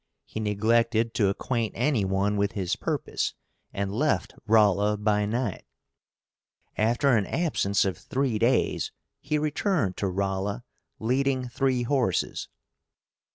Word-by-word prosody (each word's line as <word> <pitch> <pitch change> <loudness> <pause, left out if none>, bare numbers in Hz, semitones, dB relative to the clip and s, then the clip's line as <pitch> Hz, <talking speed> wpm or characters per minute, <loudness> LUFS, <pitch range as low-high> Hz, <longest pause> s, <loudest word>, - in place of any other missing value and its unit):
He - - -6
neglected 115 +2 +1
to 100 - +2
acquaint 115 +2 -2
any 125 -3 +1
one 95 +2 +1
with 100 -1 0
his 95 -3 -1
purpose, - - -2 0.4
and 100 0 -3
left 145 +7 0
Rolla 105 -1 +4
by 105 0 +1
night. 115 -3 -2 1.1
After 120 +4 +3
an 105 -3 +1
absence 100 - +1
of 95 -4 -2
three 130 -5 -1
days 120 +3 +1 0.3
he 150 +1 -1
returned 150 - 0
to 100 - -1
Rolla, 95 +3 -2 0.3
leading 130 +2 0
three 130 0 +1
horses. 125 -7 0
110 Hz, 120 wpm, -27 LUFS, 100-130 Hz, 1.1 s, Rolla